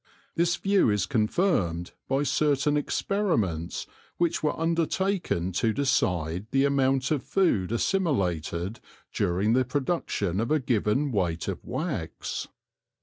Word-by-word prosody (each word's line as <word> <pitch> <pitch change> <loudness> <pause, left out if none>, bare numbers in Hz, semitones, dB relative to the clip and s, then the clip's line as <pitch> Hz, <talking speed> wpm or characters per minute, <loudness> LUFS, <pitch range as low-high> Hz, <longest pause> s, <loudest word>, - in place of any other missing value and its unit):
This 170 +1 +2
view 200 - +3
is 105 -3 +1
confirmed 105 - 0 0.2
by 135 +2 +1
certain 145 0 +2
experiments 145 - -1 0.3
which 170 -1 +1
were 150 - -1
undertaken 165 - 0
to 110 +5 +1
decide 90 - 0
the 135 +1 +3
amount 135 -1 +2
of 150 -4 +1
food 120 - +1
assimilated 100 - 0 0.3
during 95 +6 +1
the 130 +1 +4
production 125 - -1
of 115 - -1
a 155 - +3
given 125 +2 +1
weight 85 -6 -1
of - - -4
wax. - - -4
130 Hz, 120 wpm, -27 LUFS, 95-155 Hz, 0.3 s, the